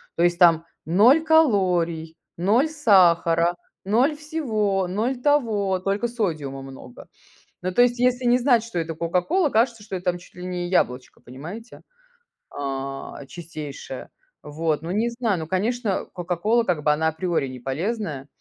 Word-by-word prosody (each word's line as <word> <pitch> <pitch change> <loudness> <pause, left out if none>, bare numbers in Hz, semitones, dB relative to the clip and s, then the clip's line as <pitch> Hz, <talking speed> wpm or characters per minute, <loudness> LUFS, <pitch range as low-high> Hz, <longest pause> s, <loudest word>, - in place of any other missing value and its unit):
то 170 - +1
есть 175 0 +2
там 165 -2 +5 0.2
0 225 - +5
калорий, 180 - +2 0.2
0 215 - +3
сахара, 175 - +4 0.3
0 245 +10 +2
всего, 220 - -1
0 230 +7 -2
того, 220 -10 +1
только 200 +5 -1
содиума 160 - -3
много. 135 -2 -12 0.6
Ну, 185 - -1
то 245 - +4
есть, 245 0 +3
если 250 0 +1
не 240 +1 +5
знать, 245 -3 +3
что 230 -5 -7
это 165 -1 -2
"Кока-Кола", 180 - +1
кажется, 230 -1 +1
что 205 -2 -6
это 180 0 -6
там 175 - -7
чуть 180 - -18
ли 180 0 -8
не 180 -1 -3
яблочко, 125 -8 -1
понимаете, 170 - -10 0.7
а, 135 0 -5
чистейшее. 150 -5 -8 0.3
Вот, 155 0 -2
ну, 165 +2 -5
не 220 +5 +1
знаю. 235 -6 -1
Ну, 160 - -5
конечно, 210 +3 -1
"Кока-Кола", 180 +6 0
как 170 -7 -1
бы, 150 - +4
она 155 +2 +1
априори 160 -3 -1
неполезная. 140 - -4
185 Hz, 150 wpm, -23 LUFS, 165-235 Hz, 0.7 s, там